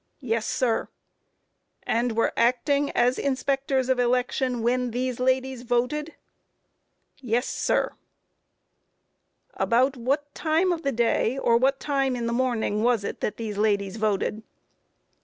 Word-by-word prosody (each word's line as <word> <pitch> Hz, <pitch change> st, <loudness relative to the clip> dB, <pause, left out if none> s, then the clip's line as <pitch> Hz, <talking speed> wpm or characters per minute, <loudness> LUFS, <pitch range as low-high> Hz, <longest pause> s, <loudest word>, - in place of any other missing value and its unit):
A. 275 Hz, -, -21 dB
Yes, 225 Hz, -2 st, 0 dB
sir. 240 Hz, -3 st, 0 dB
Q. -, -, -41 dB, 0.9 s
And 235 Hz, 0 st, 0 dB
were 230 Hz, -, +2 dB
acting 280 Hz, +4 st, +2 dB
as 250 Hz, +1 st, +2 dB
inspectors 270 Hz, -1 st, 0 dB
of 260 Hz, -1 st, +1 dB
election 250 Hz, 0 st, 0 dB
when 250 Hz, +1 st, +1 dB
these 250 Hz, +1 st, -2 dB
ladies 260 Hz, 0 st, 0 dB
voted? 250 Hz, +6 st, -1 dB
A. -, -, -19 dB, 1.0 s
Yes, 245 Hz, -1 st, -1 dB
sir. -, -, 0 dB
Q. -, -, -28 dB, 1.6 s
About 255 Hz, +4 st, +2 dB
what 280 Hz, +4 st, -1 dB
time 330 Hz, +4 st, +1 dB
in 330 Hz, -, -5 dB
the 275 Hz, -, 0 dB
day, 235 Hz, +1 st, +1 dB
or 235 Hz, -3 st, +2 dB
what 270 Hz, +3 st, +2 dB
time 275 Hz, -3 st, 0 dB
in 240 Hz, -1 st, -3 dB
the 235 Hz, -, -1 dB
morning 235 Hz, -4 st, 0 dB
was 235 Hz, -2 st, +2 dB
it -, -, -5 dB
that -, -, -2 dB
these 215 Hz, -3 st, -4 dB
ladies 200 Hz, -1 st, +1 dB
voted? 215 Hz, 0 st, -1 dB
250 Hz, 145 wpm, -25 LUFS, 230-270 Hz, 1.6 s, were